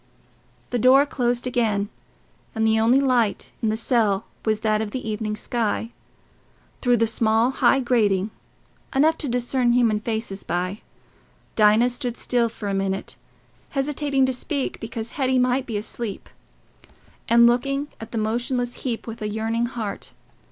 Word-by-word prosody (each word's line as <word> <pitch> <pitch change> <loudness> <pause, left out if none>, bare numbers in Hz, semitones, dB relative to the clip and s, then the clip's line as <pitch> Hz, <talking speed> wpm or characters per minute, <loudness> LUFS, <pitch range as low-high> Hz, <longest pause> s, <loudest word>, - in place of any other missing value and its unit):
The 245 - 0
door 265 +4 +6
closed 245 -3 -1
again, 220 -5 0 0.7
and 220 0 +1
the 220 0 +3
only 235 +4 +4
light 250 -6 +1
in 220 - +1
the 215 - 0
cell 220 -4 +1 0.2
was 215 -1 0
that 215 -1 +1
of 220 - -3
the 250 +1 -5
evening 215 0 -2
sky, 225 0 -2 0.9
through 245 -2 +3
the 230 - +3
small 225 +2 +2
high 270 0 +3
grating—enough 235 +6 0
to 295 - -1
discern 245 0 +1
human 230 -4 +3
faces 220 -2 -3
by. 180 +4 -2 0.7
Dinah 220 +3 +5
stood 245 -1 -4
still 240 -2 +1
for 215 -2 -7
a 200 - -1
minute, 195 0 -2 0.6
hesitating 275 -1 +1
to 260 - 0
speak 275 +2 -3
because 225 0 -5
Hetty 260 -2 +1
might 255 +1 +1
be 225 -3 -2
asleep, 210 0 -5 1.0
and 235 0 +7
looking 275 +4 +1
at 225 - -9
the 230 - -4
motionless 245 +3 -1
heap 240 -4 -3
with 225 0 -8
a 210 - -2
yearning 225 +2 -1
heart. 225 -5 -6
235 Hz, 150 wpm, -23 LUFS, 215-250 Hz, 1.0 s, and